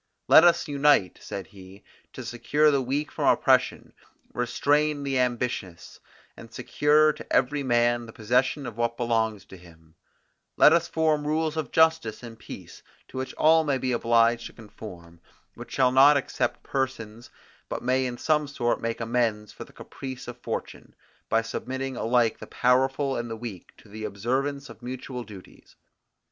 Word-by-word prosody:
"Let 160 - +8
us 175 -1 +4
unite," 140 - +2
said 100 -2 -6
he, 95 +2 -15 0.3
"to - - -8
secure 150 +5 +2
the 140 -2 +1
weak 140 +4 -2
from - - -2
oppression, - - +2 0.4
restrain 145 +4 0
the 135 -2 -1
ambitious, 120 -8 -3 0.4
and - - -13
secure 150 +1 +2
to - - -12
every 140 +3 +2
man 120 -2 +1
the - - -10
possession 125 +6 0
of 115 -2 -7
what 120 0 -1
belongs 110 -3 -1
to 95 - -13
him: 80 -2 -19 0.6
Let - - +7
us 170 0 +2
form 155 -3 0
rules 155 0 0
of 155 -6 -4
justice 160 -9 +2
and 115 -1 -10
peace, - - -11 0.3
to - - -9
which 130 - -5
all 160 +1 +4
may 140 -3 0
be 130 0 -2
obliged 115 0 +2
to - - -15
conform, 90 -6 -12 0.3
which - - -11
shall 130 -1 +3
not 140 +3 +6
except 140 - -2
persons, 120 -4 -4 0.4
but - - -5
may 130 +1 +1
in 120 -1 -6
some 150 +1 +1
sort 120 -4 -1
make 115 0 -3
amends 115 -3 -1
for - - -9
the - - -19
caprice 130 -1 -9
of 120 0 -8
fortune, - - -6 0.3
by 115 0 +2
submitting 130 +3 -5
alike 120 -1 +1
the - - -9
powerful 135 +2 +1
and 120 0 -4
the 115 - -5
weak 110 -6 -8
to - - -19
the 110 +1 -7
observance 130 +8 -2
of - - -13
mutual 125 0 -6
duties. 100 -5 -15
125 Hz, 165 wpm, -26 LUFS, 115-140 Hz, 0.6 s, Let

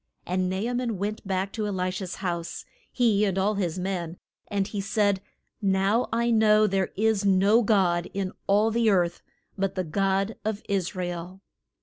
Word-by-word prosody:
And 185 0 0
Na 190 - -2
a 230 +5 -2
man 240 -4 -1
went 205 +2 -4
back 190 0 -1
to 215 -2 -2
E - - -2
li 185 -2 -1
sha's 180 -1 -5
house, 170 -3 -4 0.3
he 220 -5 +2
and 195 -2 0
all 200 +3 +2
his 185 -4 -2
men, 180 -2 -3 0.3
and 200 -2 0
he 205 0 -4
said, 200 -1 +1 0.4
Now 195 +4 +2
I 235 +1 +1
know 215 -1 +5
there 195 -2 0
is 215 -1 +2
no 200 +3 +4
God 185 -6 +2
in 195 -1 -3 0.2
all 210 +3 +3
the 230 0 +2
earth 175 -4 +1 0.4
but 195 -1 0
the 185 - -1
God 195 +5 0
of 215 -1 -3
Is 195 -3 -1
ra 180 -1 -2
el. 175 +2 -6
195 Hz, 190 wpm, -26 LUFS, 185-215 Hz, 0.4 s, know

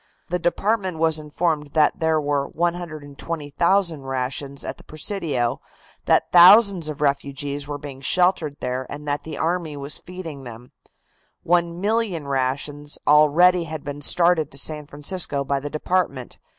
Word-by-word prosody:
The 180 +1 -1
department 190 +1 0
was 160 -1 +2
informed 150 -1 -2
that 155 +5 +3
there 160 -1 +2
were 145 -1 -1
120,000 165 +1 -1
rations 135 +1 -3
at - - -5
the - - -15
Presidio, 155 - -2 0.4
that - - +2
thousands 185 -1 +7
of 150 -1 -7
refugees 140 0 -2
were 145 0 -4
being 140 -2 -9
sheltered 175 -1 +1
there 125 +1 -3
and 150 +1 -7
that 145 0 -1
the 160 - -6
army 165 -2 -2
was 140 +1 -3
feeding 165 -6 -8
them. 120 0 -11 0.7
One 170 0 +1
million 205 -7 -1
rations 140 +2 -2
already 165 +4 +5
had 155 -2 -6
been 145 0 -6
started 170 0 +3
to 140 - -12
San 150 +1 -2
Francisco 145 -1 -2
by 140 0 -1
the 145 +2 -6
department. 155 -5 -2
150 Hz, 145 wpm, -22 LUFS, 140-175 Hz, 0.7 s, thousands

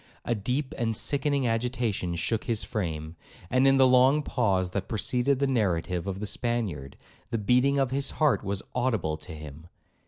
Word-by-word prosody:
A 120 - +1
deep 125 +6 -2
and 115 -2 0
sickening 140 +2 +1
agitation 115 -6 -1
shook 110 +6 -1
his 115 -4 0
frame; 80 -5 -4 0.4
and 130 +1 +4
in 135 0 +5
the 135 - +6
long 130 +4 +5
pause 95 -10 0
that 95 0 -3
preceded 125 +5 +1
the 140 - +1
narrative 90 -8 0
of 95 0 -3
the 105 - -3
Spaniard, 105 - -3 0.3
the 115 - -1
beating 125 +6 +3
of 135 -2 +1
his 135 +1 0
heart 150 -7 +2
was 100 -1 -3
audible 110 -11 0
to 80 +3 -11
him. 75 +1 -10
115 Hz, 175 wpm, -27 LUFS, 95-130 Hz, 0.4 s, the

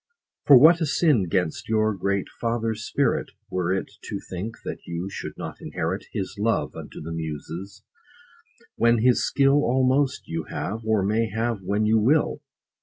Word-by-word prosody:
For 140 - +10
what 160 +6 +7
a 160 - +1
sin 140 - +2
'gainst 90 -2 -1
your 110 -1 +2
great 100 0 -1
father's 115 -1 -1
spirit, 140 -3 0 0.2
Were 90 -1 0
it 95 - -1 0.2
to - - -4
think, 95 +5 -4
that - - -4
you 85 +3 -4
should - - -7
not - - -7
inherit - - -3
His 95 +1 -4
love 115 +2 0
unto - - -9
the 80 +2 -6
Muses, 80 +4 -6 0.9
when 115 -1 +3
his 125 -1 +4
skill 140 +1 +3
Almost 130 +2 +1
you 80 -1 -3
have, 105 +7 -4
or 110 -3 +1
may 110 +3 +1
have 110 0 -2
when 100 +3 0
you 110 +1 +4
will 145 +6 +2
110 Hz, 165 wpm, -24 LUFS, 95-120 Hz, 0.9 s, For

